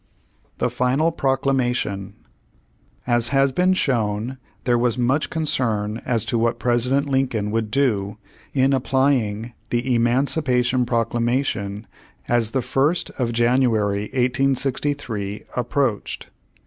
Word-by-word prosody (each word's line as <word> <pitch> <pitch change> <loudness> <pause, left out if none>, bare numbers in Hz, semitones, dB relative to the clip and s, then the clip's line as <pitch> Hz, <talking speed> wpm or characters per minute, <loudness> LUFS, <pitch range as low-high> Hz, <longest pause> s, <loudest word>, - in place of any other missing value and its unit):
THE 125 - 0
FINAL 130 +6 +1
PROCLAMATION 130 - -1 0.9
As 120 -1 +2
has 135 0 +3
been 180 +6 +2
shown 120 - -1 0.2
there 120 -2 +2
was 120 0 +1
much 130 +5 +1
concern 115 -9 -1
as 115 -3 +1
to 115 +1 0
what 115 +1 +1
President 125 +4 +1
Lincoln 130 -6 0
would 110 -1 -1
do 105 -5 0 0.3
in 135 0 +2
applying 125 -4 +1 0.2
the 125 +1 0
Emancipation 125 0 +1
Proclamation 115 -3 -1 0.4
as 120 -2 +2
the 130 +1 -1
First 150 +6 +1
of 120 -2 0
January, 115 -4 +2
1863, 130 -4 -1
approached. 125 -3 -1
125 Hz, 110 wpm, -22 LUFS, 115-135 Hz, 0.9 s, has